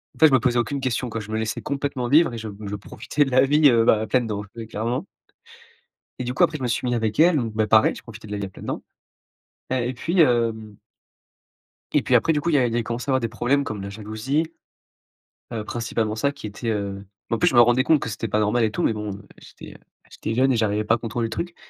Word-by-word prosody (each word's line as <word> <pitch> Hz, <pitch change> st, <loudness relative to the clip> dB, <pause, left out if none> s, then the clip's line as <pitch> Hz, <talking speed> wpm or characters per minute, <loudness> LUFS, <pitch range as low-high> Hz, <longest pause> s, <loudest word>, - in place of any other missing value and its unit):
en -, -, -19 dB
fait 160 Hz, -, +8 dB
je -, -, 0 dB
me 130 Hz, -, +6 dB
posais 120 Hz, +1 st, +1 dB
aucune 140 Hz, +3 st, -2 dB
question 125 Hz, -1 st, -1 dB
quoi 115 Hz, -, -4 dB
je 110 Hz, 0 st, -8 dB
me 110 Hz, -, -1 dB
laissais 110 Hz, -1 st, -3 dB
complètement 140 Hz, -3 st, -2 dB
vivre 155 Hz, 0 st, +5 dB
et 115 Hz, -, -6 dB
je 110 Hz, -, -6 dB
m 100 Hz, -, -9 dB
je 105 Hz, -, -3 dB
profitais 140 Hz, +8 st, -2 dB
de 135 Hz, -, -5 dB
la 130 Hz, -, +5 dB
vie, 150 Hz, +2 st, +5 dB
heu, 115 Hz, -1 st, +4 dB
bah, 110 Hz, -2 st, +4 dB
à -, -, -2 dB
pleines 125 Hz, -3 st, +1 dB
dents, 105 Hz, -1 st, -3 dB
ouais 115 Hz, -1 st, -7 dB
clairement 120 Hz, -, -3 dB, 1.1 s
et 125 Hz, -, -3 dB
du 125 Hz, +1 st, -3 dB
coup -, -, +1 dB
après 160 Hz, -3 st, +3 dB
je -, -, -8 dB
me 125 Hz, -, -1 dB
suis 120 Hz, -, -1 dB
mis 120 Hz, -, +1 dB
avec 110 Hz, 0 st, -1 dB
elle, 170 Hz, -1 st, +6 dB
donc, 115 Hz, -5 st, -1 dB
bah, 110 Hz, 0 st, +1 dB
pareil 110 Hz, 0 st, +4 dB
je -, -, -11 dB
profitais 115 Hz, -1 st, -11 dB
de 105 Hz, -, -8 dB
la 105 Hz, -, -2 dB
vie 100 Hz, -, -3 dB
à -, -, -8 dB
pleines -, -, -12 dB
dents -, -, -3 dB, 0.9 s
et 125 Hz, -1 st, 0 dB
et -, -, -3 dB
puis, 170 Hz, +8 st, -1 dB
hem 115 Hz, -5 st, +1 dB, 1.2 s
et -, -, +3 dB
puis -, -, +1 dB
après 165 Hz, -, +4 dB
du 150 Hz, -, 0 dB
coup 170 Hz, -, -1 dB
il 155 Hz, -, +1 dB
y -, -, +5 dB
a 125 Hz, -, +3 dB
il 115 Hz, -, -3 dB
y -, -, +1 dB
a 120 Hz, -, +1 dB
commencé 120 Hz, +5 st, -4 dB
à -, -, +2 dB
avoir 130 Hz, -, +2 dB
des 115 Hz, -, -1 dB
problèmes 125 Hz, +5 st, 0 dB
comme 110 Hz, -4 st, -5 dB
la 100 Hz, -, -6 dB
jalousie. 110 Hz, +9 st, -2 dB, 1.1 s
Heu, 110 Hz, -2 st, -3 dB
principalement 115 Hz, -2 st, -2 dB
ça 140 Hz, +5 st, 0 dB
qui 140 Hz, -6 st, -11 dB
était, 110 Hz, +3 st, -5 dB
heu 100 Hz, -2 st, -3 dB, 0.3 s
en 115 Hz, -, +2 dB
plus -, -, +3 dB
je 130 Hz, -, -3 dB
me 120 Hz, -, +9 dB
rendais 120 Hz, +2 st, +4 dB
compte 155 Hz, -1 st, +4 dB
que -, -, -3 dB
c'était 110 Hz, +2 st, -4 dB
pas 105 Hz, +1 st, 0 dB
normal 110 Hz, +3 st, +2 dB
et 110 Hz, -, +2 dB
tout -, -, -2 dB
mais 115 Hz, -, +2 dB
bon, 105 Hz, -2 st, -4 dB
heu, 100 Hz, 0 st, -14 dB
j'étais, -, -, -13 dB
heu, -, -, -12 dB, 0.3 s
j'étais 110 Hz, -, -4 dB
jeune 135 Hz, +1 st, +3 dB
et -, -, +2 dB
j'arrivais 105 Hz, -1 st, +1 dB
pas 110 Hz, -, +2 dB
à -, -, -3 dB
contrôler 115 Hz, 0 st, -3 dB
le 115 Hz, -, -3 dB
truc 175 Hz, +8 st, -4 dB
115 Hz, 290 wpm, -23 LUFS, 110-130 Hz, 1.2 s, me